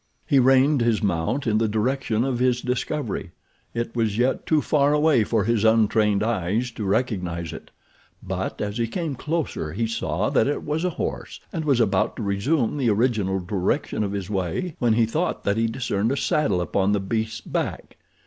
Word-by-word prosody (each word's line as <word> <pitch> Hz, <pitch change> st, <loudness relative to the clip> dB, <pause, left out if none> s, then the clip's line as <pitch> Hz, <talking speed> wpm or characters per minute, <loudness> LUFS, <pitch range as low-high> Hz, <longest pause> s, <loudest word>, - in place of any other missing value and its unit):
He 140 Hz, -, +4 dB
reined 135 Hz, +2 st, +4 dB
his 115 Hz, -2 st, +1 dB
mount 100 Hz, +9 st, 0 dB
in 110 Hz, -2 st, +2 dB
the 115 Hz, -, +2 dB
direction 110 Hz, +1 st, 0 dB
of 130 Hz, -2 st, -1 dB
his 125 Hz, -1 st, +2 dB
discovery. 125 Hz, -, -3 dB, 0.4 s
It 115 Hz, 0 st, -3 dB
was 110 Hz, -3 st, 0 dB
yet 125 Hz, +2 st, 0 dB
too 155 Hz, -, +3 dB
far 145 Hz, -1 st, +2 dB
away 150 Hz, -5 st, +4 dB
for 110 Hz, -1 st, +1 dB
his 115 Hz, 0 st, +1 dB
untrained 110 Hz, -2 st, +3 dB
eyes 110 Hz, +2 st, -1 dB
to 110 Hz, -2 st, -5 dB
recognize 90 Hz, -6 st, -1 dB
it; -, -, -10 dB, 0.5 s
but -, -, -4 dB
as 105 Hz, +2 st, -3 dB
he 115 Hz, -, +1 dB
came 160 Hz, +4 st, -3 dB
closer 145 Hz, -, -3 dB
he 115 Hz, +4 st, -1 dB
saw 105 Hz, -3 st, -1 dB
that 110 Hz, -, +3 dB
it 145 Hz, -, -1 dB
was 155 Hz, +2 st, -2 dB
a 180 Hz, -, +2 dB
horse, -, -, -4 dB
and 160 Hz, -3 st, -3 dB
was 140 Hz, -5 st, +3 dB
about 100 Hz, -5 st, +1 dB
to -, -, -5 dB
resume 115 Hz, +8 st, 0 dB
the 130 Hz, -5 st, +1 dB
original 105 Hz, -4 st, +1 dB
direction 95 Hz, +3 st, -1 dB
of 100 Hz, -, -2 dB
his 100 Hz, -3 st, -3 dB
way 100 Hz, -, -2 dB
when 120 Hz, -2 st, +3 dB
he 115 Hz, 0 st, +3 dB
thought 160 Hz, +10 st, -2 dB
that 100 Hz, +1 st, +1 dB
he 115 Hz, 0 st, +2 dB
discerned 115 Hz, -2 st, -1 dB
a 140 Hz, -, -1 dB
saddle 145 Hz, -14 st, +1 dB
upon 95 Hz, +3 st, +1 dB
the 105 Hz, -, +2 dB
beast's 110 Hz, +3 st, -2 dB
back. -, -, -4 dB
115 Hz, 190 wpm, -24 LUFS, 100-130 Hz, 0.5 s, He